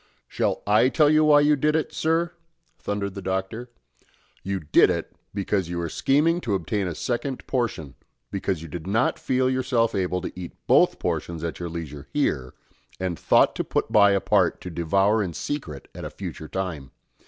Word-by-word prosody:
"Shall -, -, -1 dB
I 105 Hz, +5 st, +4 dB
tell 150 Hz, +1 st, +4 dB
you 155 Hz, 0 st, +5 dB
why 145 Hz, -1 st, +6 dB
you 150 Hz, +1 st, +4 dB
did 150 Hz, +2 st, +1 dB
it, 160 Hz, -, -1 dB
sir?" 165 Hz, +2 st, +1 dB, 0.5 s
thundered 100 Hz, -1 st, -3 dB
the 100 Hz, -, -6 dB
Doctor. 95 Hz, +6 st, -3 dB, 0.7 s
"You 95 Hz, 0 st, -2 dB
did 75 Hz, 0 st, +5 dB
it, -, -, -3 dB, 0.2 s
because 100 Hz, -3 st, -1 dB
you 90 Hz, -, -3 dB
were 85 Hz, -1 st, -2 dB
scheming 155 Hz, -, +2 dB
to 105 Hz, -, -1 dB
obtain 95 Hz, +2 st, -1 dB
a 85 Hz, -, -4 dB
second 125 Hz, -, -3 dB
portion 115 Hz, -, -2 dB, 0.4 s
because 95 Hz, -4 st, -2 dB
you -, -, -7 dB
did 85 Hz, +2 st, -7 dB
not 110 Hz, +6 st, +1 dB
feel 130 Hz, 0 st, +1 dB
yourself 130 Hz, -3 st, +1 dB
able 90 Hz, -1 st, 0 dB
to -, -, -5 dB
eat 90 Hz, -2 st, -7 dB
both -, -, +4 dB
portions 85 Hz, -2 st, -3 dB
at 85 Hz, -, -4 dB
your 85 Hz, -1 st, -4 dB
leisure 75 Hz, -4 st, -7 dB
here, 70 Hz, -, -1 dB, 0.4 s
and 90 Hz, -2 st, -3 dB
thought -, -, +4 dB
to -, -, 0 dB
put -, -, -2 dB
by 100 Hz, -1 st, +6 dB
a 100 Hz, -, +3 dB
part 95 Hz, -3 st, +2 dB
to 90 Hz, -, -7 dB
devour 95 Hz, +6 st, +2 dB
in 90 Hz, -5 st, -3 dB
secret 85 Hz, -, -5 dB
at -, -, -8 dB
a -, -, -4 dB
future 80 Hz, -, -7 dB
time. 85 Hz, -7 st, -4 dB
100 Hz, 190 wpm, -24 LUFS, 85-130 Hz, 0.7 s, why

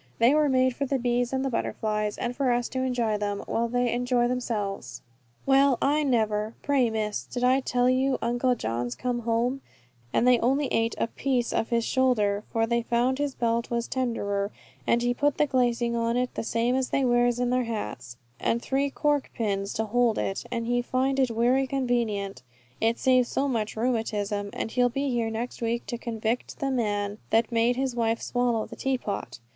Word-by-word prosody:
They 235 Hz, +4 st, +5 dB
were 300 Hz, -1 st, +3 dB
made 255 Hz, -1 st, +2 dB
for 280 Hz, -, -2 dB
the 275 Hz, -, +1 dB
bees 245 Hz, 0 st, 0 dB
and 265 Hz, 0 st, -1 dB
the -, -, 0 dB
butterflies, 210 Hz, -2 st, -1 dB
and 240 Hz, 0 st, -3 dB
for 270 Hz, -2 st, +1 dB
us 240 Hz, 0 st, +1 dB
to 260 Hz, -, -3 dB
enjoy 240 Hz, -5 st, 0 dB
them, 205 Hz, -1 st, -2 dB
while 235 Hz, +1 st, 0 dB
they 245 Hz, 0 st, 0 dB
enjoy 245 Hz, 0 st, +1 dB
themselves." 225 Hz, -5 st, -3 dB, 0.4 s
"Well, 275 Hz, -1 st, +4 dB
I 295 Hz, +2 st, +2 dB
never. 220 Hz, -5 st, 0 dB
Pray, 270 Hz, -4 st, +2 dB
Miss, 215 Hz, -1 st, -2 dB
did 245 Hz, -, -4 dB
I 255 Hz, +2 st, +4 dB
tell 250 Hz, -2 st, +1 dB
you 260 Hz, +1 st, +2 dB
Uncle 245 Hz, +2 st, +1 dB
John's 120 Hz, -, -3 dB
come 245 Hz, -1 st, -2 dB
home, 240 Hz, +3 st, 0 dB, 0.5 s
and 240 Hz, -, +2 dB
they 250 Hz, -1 st, +6 dB
only 270 Hz, +5 st, +2 dB
ate 225 Hz, 0 st, +1 dB
a -, -, +1 dB
piece 245 Hz, 0 st, -1 dB
of 225 Hz, -, 0 dB
his 235 Hz, -1 st, +1 dB
shoulder 215 Hz, -6 st, +2 dB
for 225 Hz, 0 st, +2 dB
they 235 Hz, +1 st, +1 dB
found 240 Hz, +3 st, +1 dB
his 290 Hz, -2 st, -1 dB
belt 235 Hz, 0 st, 0 dB
was 235 Hz, 0 st, -1 dB
tenderer; 205 Hz, -6 st, -1 dB, 0.4 s
and 235 Hz, 0 st, +3 dB
he 245 Hz, 0 st, +2 dB
put 290 Hz, +3 st, +1 dB
the 300 Hz, -, +4 dB
glazing 240 Hz, -3 st, +1 dB
on 230 Hz, +1 st, 0 dB
it 250 Hz, 0 st, -1 dB
the -, -, -3 dB
same 230 Hz, +2 st, 0 dB
as 260 Hz, -1 st, 0 dB
they 275 Hz, -, +1 dB
wears 240 Hz, 0 st, +3 dB
on 245 Hz, 0 st, +1 dB
their 250 Hz, -1 st, +1 dB
hats, 210 Hz, -, -5 dB, 0.2 s
and 230 Hz, -, +1 dB
three 275 Hz, +3 st, 0 dB
cork 290 Hz, 0 st, 0 dB
pins 200 Hz, -4 st, -1 dB
to 220 Hz, -, -1 dB
hold 235 Hz, +1 st, +2 dB
it, 195 Hz, -, -2 dB
and 230 Hz, -1 st, -2 dB
he 245 Hz, +1 st, +1 dB
find 260 Hz, +2 st, 0 dB
it 260 Hz, -2 st, +3 dB
werry 245 Hz, +4 st, +2 dB
convenient, 235 Hz, -, -1 dB, 0.4 s
it 225 Hz, +1 st, +2 dB
save 255 Hz, -2 st, +3 dB
so 275 Hz, +3 st, 0 dB
much 225 Hz, -5 st, -2 dB
rheumatism: 215 Hz, -3 st, -1 dB
and 225 Hz, -, -4 dB
he'll 245 Hz, 0 st, +3 dB
be 275 Hz, +2 st, -1 dB
here 235 Hz, -2 st, 0 dB
next 230 Hz, +3 st, -5 dB
week 235 Hz, +1 st, -1 dB
to 240 Hz, -, -4 dB
convict 230 Hz, 0 st, -3 dB
the 275 Hz, -1 st, -1 dB
man 205 Hz, -4 st, -1 dB
that 225 Hz, +1 st, +2 dB
made 235 Hz, +1 st, +2 dB
his 260 Hz, -1 st, -1 dB
wife 230 Hz, -1 st, +1 dB
swallow 245 Hz, -3 st, 0 dB
the -, -, -10 dB
tea 270 Hz, -1 st, 0 dB
pot. 200 Hz, -, -5 dB
240 Hz, 200 wpm, -27 LUFS, 225-255 Hz, 0.5 s, they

